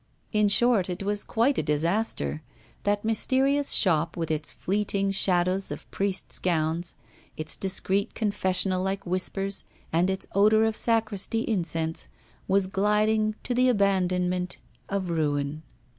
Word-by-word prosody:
In 210 Hz, -1 st, +3 dB
short, 205 Hz, -2 st, +3 dB
it 180 Hz, +3 st, -4 dB
was 205 Hz, +1 st, -1 dB
quite 240 Hz, +4 st, +1 dB
a -, -, +2 dB
disaster; 150 Hz, -, -1 dB, 0.4 s
that 205 Hz, +1 st, 0 dB
mysterious 270 Hz, +5 st, +2 dB
shop, 165 Hz, -3 st, +2 dB
with 165 Hz, -2 st, -2 dB
its 155 Hz, -1 st, -1 dB
fleeting 195 Hz, 0 st, -1 dB
shadows 185 Hz, 0 st, +2 dB
of -, -, -7 dB
priests' 195 Hz, -1 st, -1 dB
gowns, 170 Hz, 0 st, -1 dB, 0.4 s
its 155 Hz, 0 st, +1 dB
discreet 195 Hz, +1 st, -1 dB
confessional 190 Hz, -3 st, +1 dB
like 195 Hz, +1 st, -3 dB
whispers, 195 Hz, +2 st, -1 dB, 0.3 s
and 175 Hz, +3 st, +2 dB
its 190 Hz, 0 st, -3 dB
odour 215 Hz, +2 st, +4 dB
of 220 Hz, -1 st, +1 dB
sacristy 225 Hz, -1 st, +1 dB
incense, 165 Hz, -6 st, -2 dB, 0.4 s
was 195 Hz, 0 st, +3 dB
gliding 210 Hz, +2 st, +1 dB
to 250 Hz, -, -2 dB
the 255 Hz, +1 st, +3 dB
abandonment 185 Hz, -4 st, 0 dB, 0.3 s
of 195 Hz, -3 st, -2 dB
ruin. 145 Hz, -2 st, -1 dB
195 Hz, 130 wpm, -26 LUFS, 175-210 Hz, 0.4 s, odour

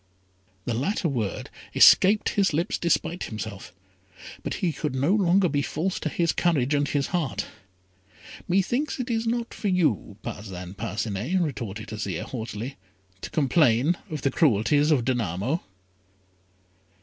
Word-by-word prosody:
The 120 Hz, -, -1 dB
latter 170 Hz, -, 0 dB
word 115 Hz, -9 st, -3 dB, 0.2 s
escaped 205 Hz, +3 st, +6 dB
his 200 Hz, -5 st, +1 dB
lips 170 Hz, +6 st, 0 dB
despite 170 Hz, +1 st, 0 dB
himself: 110 Hz, -2 st, -7 dB, 0.7 s
but -, -, -3 dB
he 175 Hz, -4 st, -1 dB
could 150 Hz, -4 st, -3 dB
no 140 Hz, +8 st, +2 dB
longer 190 Hz, -2 st, +4 dB
be 145 Hz, -3 st, 0 dB
false 170 Hz, +6 st, -2 dB
to 155 Hz, -, -2 dB
his 170 Hz, +2 st, +1 dB
courage 150 Hz, -6 st, +1 dB
and 145 Hz, 0 st, +2 dB
his 140 Hz, -1 st, 0 dB
heart. 165 Hz, -8 st, -1 dB, 1.0 s
"Methinks 240 Hz, -, 0 dB
it 250 Hz, 0 st, -2 dB
is 225 Hz, 0 st, 0 dB
not 235 Hz, 0 st, -1 dB
for 210 Hz, -, -4 dB
you, 155 Hz, -, +1 dB
Parcin 90 Hz, -3 st, -7 dB
Parcinet," 110 Hz, -, -2 dB
retorted 115 Hz, -, -3 dB
Azire, 100 Hz, -5 st, -3 dB
haughtily, 115 Hz, +1 st, -6 dB, 0.4 s
"to -, -, -6 dB
complain 140 Hz, 0 st, +3 dB
of 155 Hz, -3 st, -5 dB
the 135 Hz, -, +2 dB
cruelties 145 Hz, -, +3 dB
of 135 Hz, -7 st, +3 dB
Danamo." 120 Hz, -, -1 dB
145 Hz, 135 wpm, -26 LUFS, 110-175 Hz, 1.0 s, escaped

